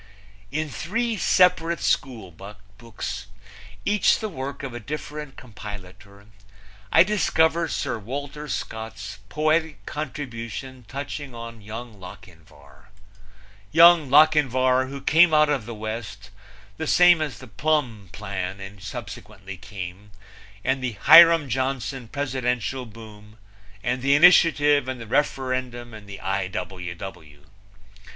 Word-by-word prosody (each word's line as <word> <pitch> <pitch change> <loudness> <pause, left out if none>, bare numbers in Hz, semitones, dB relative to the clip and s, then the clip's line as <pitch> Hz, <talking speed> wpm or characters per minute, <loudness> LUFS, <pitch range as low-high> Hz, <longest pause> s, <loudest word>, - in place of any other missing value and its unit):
In 155 +1 -2
three 220 - -2
separate 180 -4 +3
schoolbooks, 100 -1 -5 0.6
each 210 -1 +3
the 220 - -4
work 140 -4 -6
of 135 -3 -5
a 120 - -6
different 150 +2 -7
compilator, 100 -3 -11 0.7
I - - +7
discover 170 -5 +1
Sir 115 - -3
Walter 140 +6 -6
Scott's 110 -3 -6
poetic 155 +3 0
contribution 130 -3 -6
touching 140 0 -6
on 115 -1 -9
Young 110 +1 -9
Lochinvar 80 -5 -15 0.8
Young 170 -3 +7
Lochinvar 130 -3 +4
who 140 0 -7
came 160 0 +5
out 150 0 +5
of 135 -7 -1
the 120 - -6
West, 110 -3 -7 0.5
the 160 - -4
same 175 0 +5
as 150 -5 -3
the 130 - -11
Plumb 120 - -1
plan 95 0 -6
subsequently 100 -2 -8
came, 95 0 -9 0.5
and 130 0 0
the 125 -2 -2
Hiram 165 -2 +8
Johnson 130 0 -3
presidential 130 -2 -2
boom 105 -1 -14 0.5
and 125 0 -1
the 140 +2 +3
initiative 145 -4 +5
and 130 -1 -4
the 115 - -8
referendum 130 -2 -2
and 105 -2 -12
the 100 - -8
I. 95 0 -2
W. 90 -2 -6
W. 80 -6 -10
125 Hz, 115 wpm, -24 LUFS, 105-150 Hz, 0.8 s, Hiram